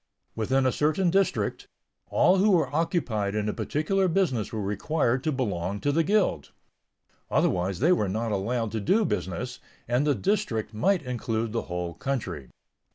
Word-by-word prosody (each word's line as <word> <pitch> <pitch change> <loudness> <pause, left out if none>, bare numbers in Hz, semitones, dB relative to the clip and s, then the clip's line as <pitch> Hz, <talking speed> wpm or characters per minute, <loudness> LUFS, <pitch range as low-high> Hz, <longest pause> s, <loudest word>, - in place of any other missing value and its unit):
Within 130 +4 +1
a 130 - +3
certain 155 +6 +1
district, 195 +1 0 0.4
all 190 - +4
who 200 +3 +4
were 170 -6 +2
occupied 115 - 0
in 105 0 -1
a 105 - -1
particular 190 +6 0
business 160 - 0
were 110 - -3
required 120 +5 0
to 155 - +1
belong 100 - -2
to 145 - +1
the 165 +3 +3
guild; 195 - +1 0.8
otherwise 90 +2 +1
they 165 +6 +4
were 105 - +2
not 110 +3 -2
allowed 110 +3 -1
to 110 - -2
do 205 - +2
business, 125 - -3 0.3
and 125 +5 +1
the 145 - +3
"district" 185 - -1
might 160 - +1
include 115 -3 -2
the 115 - 0
whole 90 -1 -3
country. 90 - -4
125 Hz, 160 wpm, -27 LUFS, 105-165 Hz, 0.8 s, all